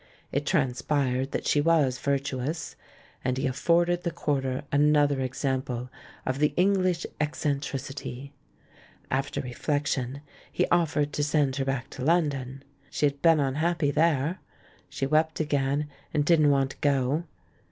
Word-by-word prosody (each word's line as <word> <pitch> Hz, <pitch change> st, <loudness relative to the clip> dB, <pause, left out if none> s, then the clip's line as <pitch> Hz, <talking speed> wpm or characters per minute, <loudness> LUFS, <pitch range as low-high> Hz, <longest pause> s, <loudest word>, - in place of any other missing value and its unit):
It 145 Hz, +2 st, -2 dB
transpired 135 Hz, -3 st, 0 dB
that -, -, -3 dB
she 145 Hz, -, +3 dB
was 145 Hz, -5 st, +2 dB
virtuous; 140 Hz, +2 st, -2 dB, 0.5 s
and 130 Hz, 0 st, 0 dB
he 135 Hz, -, -1 dB
afforded 170 Hz, +6 st, +2 dB
the 175 Hz, -, -1 dB
quarter 140 Hz, -5 st, -1 dB
another 145 Hz, -1 st, +3 dB
example 130 Hz, -1 st, -2 dB, 0.3 s
of 130 Hz, +1 st, -1 dB
"the 150 Hz, 0 st, +2 dB
English 185 Hz, -2 st, +2 dB
ec 150 Hz, 0 st, 0 dB
centricity." 140 Hz, -2 st, -4 dB, 0.8 s
After 135 Hz, +1 st, -1 dB
reflection, 140 Hz, 0 st, -2 dB, 0.3 s
he -, -, +1 dB
offered 150 Hz, -3 st, +1 dB
to 145 Hz, -, 0 dB
send 145 Hz, -2 st, +1 dB
her 135 Hz, -, 0 dB
back 135 Hz, 0 st, -3 dB
to 130 Hz, -, -6 dB
London. 140 Hz, -5 st, 0 dB, 0.3 s
She -, -, 0 dB
had 140 Hz, -1 st, -1 dB
been 165 Hz, -2 st, +5 dB
unhappy 150 Hz, +2 st, +1 dB
there 155 Hz, +2 st, +1 dB, 0.3 s
— -, -, -28 dB
she -, -, -2 dB
wept 155 Hz, +3 st, +1 dB
again, 145 Hz, -1 st, 0 dB, 0.3 s
and 145 Hz, -1 st, +2 dB
didn't 155 Hz, -2 st, +5 dB
want 135 Hz, -1 st, +2 dB
to -, -, -12 dB
go. 140 Hz, +3 st, +1 dB
145 Hz, 140 wpm, -27 LUFS, 135-155 Hz, 0.8 s, been